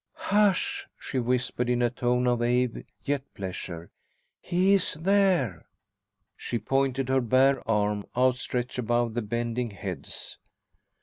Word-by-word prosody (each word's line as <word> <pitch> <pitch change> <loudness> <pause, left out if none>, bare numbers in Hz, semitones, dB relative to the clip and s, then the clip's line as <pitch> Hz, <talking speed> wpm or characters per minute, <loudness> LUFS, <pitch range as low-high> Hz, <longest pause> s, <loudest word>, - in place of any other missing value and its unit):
"Hush!" 205 -2 +1
she 130 - -3
whispered 125 0 0
in 125 0 +2
a 120 - +2
tone 125 0 +1
of 120 -1 +2
awe, 125 0 +1 0.2
yet 145 -1 0
pleasure. 90 -3 -6 0.5
"He 185 +3 +2
is 195 -6 +2
there!" 175 - +2 0.7
She 120 - -3
pointed, 135 +3 0
her 130 0 +3
bare 130 +3 +3
arm 105 -1 +1
outstretched 125 -1 0
above 120 -1 +1
the 120 - -1
bending 120 +2 -2
heads. 100 -3 -7
125 Hz, 125 wpm, -27 LUFS, 115-135 Hz, 0.7 s, her